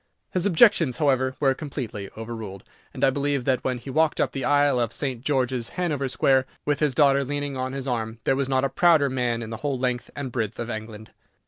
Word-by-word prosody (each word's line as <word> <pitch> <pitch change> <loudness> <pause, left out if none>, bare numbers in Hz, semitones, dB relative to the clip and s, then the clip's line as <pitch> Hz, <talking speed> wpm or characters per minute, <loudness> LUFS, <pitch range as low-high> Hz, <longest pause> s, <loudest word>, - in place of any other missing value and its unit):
His 185 +1 +1
objections, 175 - +4
however, 130 -4 +1
were 135 -2 +3
completely 125 -9 -6
overruled, 110 -4 -7 0.3
and - - -6
I 135 - +5
believe 140 -1 -1
that 130 -2 +1
when 130 -1 -1
he 125 +3 -8
walked 155 +2 +2
up - - +1
the 135 - -4
aisle 145 -1 +3
of 115 -2 0
St. 130 -2 -3
George's, 130 -4 0
Hanover 150 -7 -1
Square, 130 0 +2 0.2
with 145 -1 0
his 150 -4 +1
daughter 140 -1 +4
leaning 145 0 -3
on 130 0 -3
his 135 -1 -4
arm, 115 -2 -2
there - - +2
was 135 0 -1
not 130 0 +2
a 135 - +1
prouder 155 -2 +4
man 120 -2 -1
in 110 - -7
the 110 - -4
whole 140 +2 -2
length 125 -1 -2
and 140 -3 -5
breadth 115 -3 -3
of 120 0 -3
England. 110 -1 -7
130 Hz, 220 wpm, -25 LUFS, 120-145 Hz, 0.3 s, I